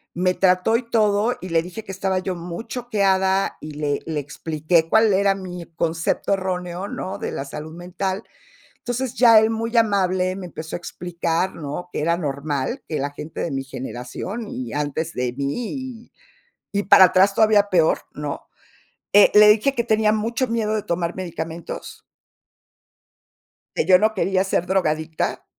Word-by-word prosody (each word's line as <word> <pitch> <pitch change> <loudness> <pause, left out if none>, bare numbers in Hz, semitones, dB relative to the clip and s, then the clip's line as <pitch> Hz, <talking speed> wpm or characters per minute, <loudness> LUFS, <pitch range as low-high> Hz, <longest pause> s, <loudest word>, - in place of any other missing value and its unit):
me 180 +1 +1
trató 185 +4 +3
y 245 - -5
todo, 215 +1 +2
y 185 - -6
le 165 -1 +2
dije 180 +5 -8
que 195 - -8
estaba 190 0 -1
yo 185 0 -3
muy 170 +5 -7
choqueada, 195 -5 +1
y 155 - -7
le 145 -1 -2
le 155 -2 -2
expliqué 155 +3 0
cuál 220 +2 +4
era 195 +1 +3
mi 180 -3 -7
concepto 165 +3 0
erróneo, 185 -1 -3
¿no?, 190 -1 -5
de - - -4
la 135 - -4
salud 155 +3 -8
mental. 185 +3 -4 0.6
Entonces, 245 +1 -3
ya 230 -3 +7
él 220 0 +2
muy 230 +1 -3
amable 185 -4 +2
me 190 -2 -7
empezó 160 -1 -7
a - - -4
explicar, 175 +1 -2
¿no?, 155 +3 -6
que - - -2
era 170 +2 +1
normal 145 - -3
que 155 - -2
la 140 +1 -2
gente 150 +2 -8
de 170 - -2
mi 135 -1 -2
generación, 135 - -6
y 125 -2 -6
antes 150 +3 -2
de 125 -1 -1
mí, 140 - -3 0.4
y - - -56 0.7
y 200 - +2
para 190 - +8
atrás 185 +2 +4
todavía 210 -2 +4
peor, 165 -3 +3
¿no? 145 -1 -6 0.7
Eh, 205 +1 +8
le 210 0 +9
dije 225 +6 +3
que 235 - +1
tenía 220 -2 +2
mucho 230 +4 -1
miedo 225 -2 -1
de 215 - 0
tomar 170 -3 -2
medicamentos 165 -2 -6 1.7
que - - +1
yo 185 +1 +6
no 220 +2 +2
quería 190 -2 +1
ser 185 -2 0
drogadicta, 160 -4 -1
185 Hz, 170 wpm, -22 LUFS, 160-210 Hz, 1.7 s, le